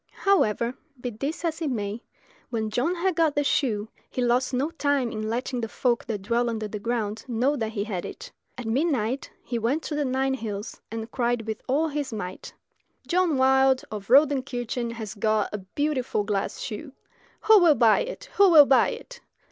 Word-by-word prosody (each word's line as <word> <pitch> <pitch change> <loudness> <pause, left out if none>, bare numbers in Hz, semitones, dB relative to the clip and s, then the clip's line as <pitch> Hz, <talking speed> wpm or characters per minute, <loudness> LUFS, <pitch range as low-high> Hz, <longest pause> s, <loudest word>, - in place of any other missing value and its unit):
However, 235 - +3 0.3
be 245 0 -4
this 280 +10 -4
as 330 0 -2
it 310 - 0
may, 210 -2 -3 0.5
when 220 -2 -2
John 265 +11 0
had 360 0 0
got 320 -3 +2
the 290 - +2
shoe 220 -7 0 0.2
he - - -6
lost 245 +1 +2
no 270 +5 0
time 285 -6 0
in 215 0 -3
letting 245 +2 -2
the 225 - -2
folk 240 +1 0
that 210 -4 -4
dwell 235 +3 +1
under 220 -2 -3
the 210 0 -6
ground 220 -1 -2
know 250 +4 +1
that 225 -4 -3
he 200 -2 -1
had 195 -5 -4
it. - - -8 0.3
At 245 - -6
midnight 255 0 0
he 235 - -3
went 255 +8 0
to - - -4
the 295 - 0
Nine 265 0 0
hills, 215 -4 -5
and 225 +1 -6
cried 240 -2 0
with 220 -1 -4
all 295 +5 +2
his 290 -3 -3
might 185 -4 -6 0.5
"John 355 -4 +2
Wilde 265 0 +4
of 205 -2 -6
Rodenkirchen 255 -4 +2
has 220 -3 -6
got 215 -1 0
a 210 - -2
beautiful 255 +2 -1
glass 200 -1 -2
shoe. 270 +6 -6 0.5
Who 435 -1 +7
will 335 -5 +6
buy 230 -4 +5
it? - - -5
who 400 -1 +7
will 310 -4 +9
buy 270 -1 +4
it?" - - -9
245 Hz, 190 wpm, -26 LUFS, 220-285 Hz, 0.5 s, will